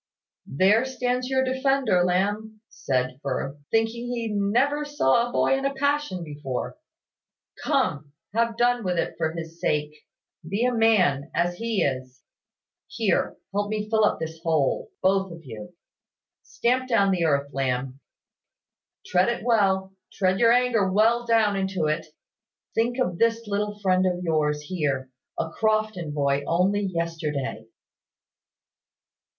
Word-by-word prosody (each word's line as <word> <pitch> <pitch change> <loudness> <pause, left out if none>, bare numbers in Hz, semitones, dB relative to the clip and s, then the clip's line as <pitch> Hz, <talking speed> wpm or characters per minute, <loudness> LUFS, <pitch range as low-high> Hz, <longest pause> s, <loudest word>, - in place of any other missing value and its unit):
"There 195 - +3
stands 250 -1 -2
your 265 0 +2
defender, 260 -7 +2
Lamb," 205 +4 -1
said 130 0 -2
Firth, 140 +1 -3
"thinking 225 +2 0
he 235 -2 -3
never 235 +9 +1
saw 240 - +2
a - - -10
boy 270 - +2
in 270 - -3
a 275 0 -1
passion 285 -10 0
before. 145 -5 -5 0.9
Come, 165 - 0 0.2
have 230 0 0
done 245 -1 +2
with 180 -2 -1
it - - -1
for 160 - 0
his 165 0 -8
sake: 150 0 0 0.6
be 205 +6 0
a 250 - +1
man, 185 - +3
as 175 +1 0
he 230 -3 0
is. 130 -1 -3 0.6
Here, - - 0 0.2
help 205 0 -1
me 215 -1 -1
to 210 - -12
fill 220 -1 +3
up 210 - +2
this 160 0 -6
hole 160 -5 0
both 195 0 +2
of 165 -2 -11
you. 110 +4 -9 0.7
Stamp 255 +2 -1
down 200 -5 +3
the 175 -3 +1
earth, 140 -2 0
Lamb. 130 0 -2 1.1
Tread 180 +4 +2
it 235 -1 -3
well 195 -5 +2 0.2
tread 190 0 +1
your 230 -1 +5
anger 235 -5 +2
well 230 +4 +3
down 220 -3 +3
into 190 -3 -1
it. 155 +2 -1 0.7
Think 235 +2 0
of 180 -10 -1
this 230 0 +2
little 210 0 -2
friend 185 -1 +3
of 180 0 -2
yours 150 -3 0
here 140 -6 -2 0.3
a 160 - -2
Crofton 215 -7 0
boy 140 -1 0
only 190 +4 +2
yesterday." 160 - -3
195 Hz, 145 wpm, -25 LUFS, 155-230 Hz, 1.1 s, your